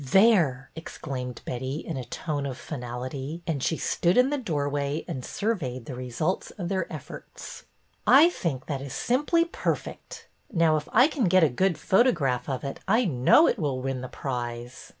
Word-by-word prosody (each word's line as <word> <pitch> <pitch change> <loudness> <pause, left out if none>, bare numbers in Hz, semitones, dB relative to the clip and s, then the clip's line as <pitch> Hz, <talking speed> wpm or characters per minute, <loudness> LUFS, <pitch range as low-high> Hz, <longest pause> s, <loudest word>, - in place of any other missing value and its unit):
There! 160 - +4
" - - -38
exclaimed 130 -6 -6
Betty, 130 +2 -3
in 160 +1 -5
a 130 - -4
tone 145 +3 -3
of 130 -2 -5
final 125 -4 -6
ity, 140 +6 -5
and 155 -5 -2
she 160 - 0
stood 175 +4 +1
in 255 +3 +5
the 290 - +1
doorway 145 - -2
and 140 -8 -5
surveyed 140 - -2
the 135 - -6
results 130 +8 -2
of 175 -4 -4
their 190 -1 -2
efforts. - - -9 0.2
'' - - -39 0.2
I 345 - +5
think 135 - -3
that 140 -3 -3
is 140 -2 -6
simply 295 +7 +2
perfect. 340 - -4 0.2
Now, 165 -2 +3
if 150 -1 -3
I 250 +5 +6
can 285 -7 -1
get 185 0 +5
a 155 - +5
good 175 +7 +1
photograph 155 - +2
of 130 -2 -3
it 140 - -5
I 225 +5 +3
know 145 - +5
it 240 - +1
will 140 -5 -1
win 130 0 -3
the 130 - -5
prize." 120 -2 -5
145 Hz, 190 wpm, -26 LUFS, 130-185 Hz, 0.2 s, I